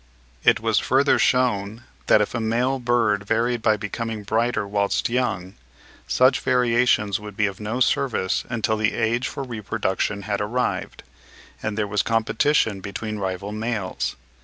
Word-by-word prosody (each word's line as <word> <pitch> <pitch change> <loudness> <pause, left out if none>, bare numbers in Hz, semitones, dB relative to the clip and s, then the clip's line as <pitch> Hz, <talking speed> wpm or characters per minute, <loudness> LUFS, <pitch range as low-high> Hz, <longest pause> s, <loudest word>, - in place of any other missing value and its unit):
It - - +5
was - - +2
further 135 +2 +3
shewn 115 -3 +1 0.2
that 105 - +6
if 105 - -1
a 120 - -1
male 120 +4 0
bird 115 -4 +1
varied 115 +2 +1
by 110 -1 +3
becoming 110 +1 -4
brighter 110 0 0
whilst 100 +2 0
young, 105 -7 -1 0.5
such 130 +1 +4
variations 120 -5 +2
would 105 -2 -10
be 105 - +3
of 100 -2 -4
no 110 +4 -3
service 120 -7 +1
until 110 -2 0
the 105 0 +1
age 115 +2 0
for 140 - -5
reproduction 105 -4 -2
had 100 0 -2
arrived, 120 +5 -2 0.6
and 110 -1 -3
there 105 - +1
was 105 0 0
competition 115 0 +1
between 105 +2 -5
rival 95 +1 -3
males. 110 -3 -3
110 Hz, 150 wpm, -23 LUFS, 105-120 Hz, 0.6 s, that